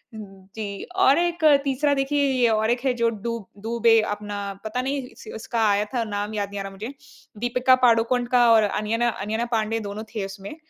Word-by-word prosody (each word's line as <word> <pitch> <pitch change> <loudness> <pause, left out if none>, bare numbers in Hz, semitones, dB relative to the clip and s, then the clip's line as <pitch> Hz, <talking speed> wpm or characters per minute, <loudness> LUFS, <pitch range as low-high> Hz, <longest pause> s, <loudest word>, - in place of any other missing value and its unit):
जी, 200 0 -8
और 335 -7 +5
एक 345 -1 -1 0.2
तीसरा 285 +1 +1
देखिए 285 +1 0
ये 245 -3 +3
और 220 0 +1
एक 245 0 0
है 260 - +3
जो 235 -1 +1
डूब 230 -1 -5 0.2
डूबे 230 0 +3
अपना 205 0 -5 0.3
पता 220 +4 -2
नहीं 275 +1 -2
इस - - -15
उसका 225 +1 -1
आया 205 +1 +2
था 235 - +1
नाम 205 0 -4
याद 200 -1 -2
नहीं 200 0 -6
आ - - -3
रहा 195 - -7
मुझे 215 +7 -7 0.4
दीपिका 250 +3 +3
पादुकोण 235 +1 +3
का 240 -1 +6
और 220 -1 +5
अनियना 220 +3 0
अनन्या 220 +2 -3
पाण्डे 225 0 0
दोनों 210 +2 -6
थे 205 -3 -2
उसमें। 195 +7 -8
225 Hz, 195 wpm, -24 LUFS, 210-245 Hz, 0.4 s, का